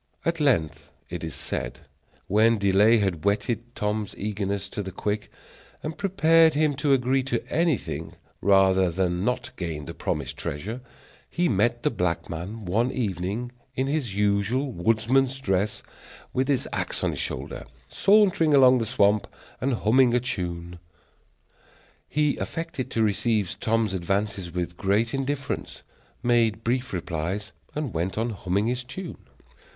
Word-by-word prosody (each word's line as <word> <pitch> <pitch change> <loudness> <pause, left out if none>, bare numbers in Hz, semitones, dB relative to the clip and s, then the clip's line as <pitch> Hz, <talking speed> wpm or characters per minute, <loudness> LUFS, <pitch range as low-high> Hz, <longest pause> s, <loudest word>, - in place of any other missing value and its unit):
At 170 0 0
length, 80 - +1 0.2
it 85 -1 -5
is 80 -4 -4
said, - - -4 0.4
when 110 +3 +4
delay 100 +3 +5
had 95 -7 0
whetted 110 +4 -1
Tom's 105 -1 -2
eagerness 100 -1 -2
to 105 - -4
the 95 -1 -5
quick 105 +3 -3 0.5
and 155 +1 -4
prepared 165 -5 +4
him 150 -1 +3
to 145 -1 +3
agree 130 +1 +2
to 120 -3 -2
anything 165 -5 0 0.3
rather 95 -2 +4
than 90 +1 0
not 125 +3 -1
gain 80 -5 -4
the - - -7
promised - - -3
treasure, 105 - -4 0.5
he 175 +1 +1
met 120 +3 +1
the - - +2
black 90 -6 -1
man 95 +7 -6
one 115 +8 +1
evening 105 +1 -2 0.2
in 130 - 0
his 135 -8 -1
usual 105 +7 +1
woodsman's 115 +7 +2
dress, 100 -4 -1 0.5
with 130 +1 +1
his 140 -3 +1
axe - - -2
on - - +2
his - - -5
shoulder, - - -4 0.2
sauntering 190 - +4
along 130 -2 +7
the 115 - -1
swamp 105 -3 +3 0.3
and 135 +1 +1
humming 125 +2 +5
a - - +4
tune. 90 -7 -4 1.3
He 150 -1 +1
affected 165 -5 -4
to 115 - +1
receive 105 -1 0
Tom's 110 -3 +1
advances 95 0 -1
with 85 0 -3
great 105 +4 +1
indifference, 135 0 -3 0.4
made 115 -2 +2
brief 125 +2 0
replies, 90 +4 -3 0.2
and 150 -6 -3
went 85 +5 -2
on 115 +2 0
humming 100 0 -1
his 125 +2 -1
tune. 180 +9 -8
110 Hz, 145 wpm, -26 LUFS, 95-130 Hz, 1.3 s, along